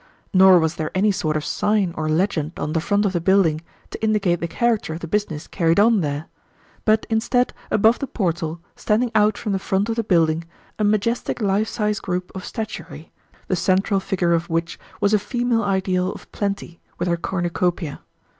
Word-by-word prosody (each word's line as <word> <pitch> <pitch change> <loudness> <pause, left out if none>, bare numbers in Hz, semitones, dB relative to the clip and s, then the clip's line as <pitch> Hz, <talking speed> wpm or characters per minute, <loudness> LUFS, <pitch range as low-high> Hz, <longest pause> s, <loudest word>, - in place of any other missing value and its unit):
Nor 190 -1 +7
was 160 0 0
there 155 -1 -2
any 205 +3 +3
sort 155 -6 -1
of 155 - -4
sign 205 -4 +1
or 155 0 -2
legend 160 -1 0
on 155 - -3
the 160 - +1
front 205 +4 +1
of 195 - 0
the 175 - 0
building 170 -4 +3 0.3
to - - -8
indicate 205 -6 +2
the 170 - -2
character 230 -4 0
of 165 - -8
the 165 - -5
business 170 -5 -2
carried 165 -1 +1
on 220 -1 +5
there; 145 0 -2 0.6
but 215 0 +3
instead, 245 +2 +1 0.2
above 220 +3 +4
the 275 - -3
portal, 170 -6 -2 0.2
standing 225 +3 0
out 210 -1 +3
from 215 - -3
the 195 - 0
front 195 +3 0
of 225 - 0
the 230 - 0
building, 165 -4 +2 0.4
a - - +1
majestic 215 +4 0
life 205 0 +1
size 210 -2 -1
group 180 0 -3
of 190 - -6
statuary, 210 -7 -7 0.4
the 185 - +1
central 195 +2 +2
figure 185 -3 0
of 170 0 0
which 165 +1 -2 0.2
was 205 +1 +2
a 210 - +5
female 240 +1 0
ideal 190 -2 0
of - - -12
Plenty, 195 -4 -4 0.2
with 175 - -2
her 170 - +2
cornucopia. 175 -2 -2
190 Hz, 190 wpm, -22 LUFS, 170-210 Hz, 0.6 s, Nor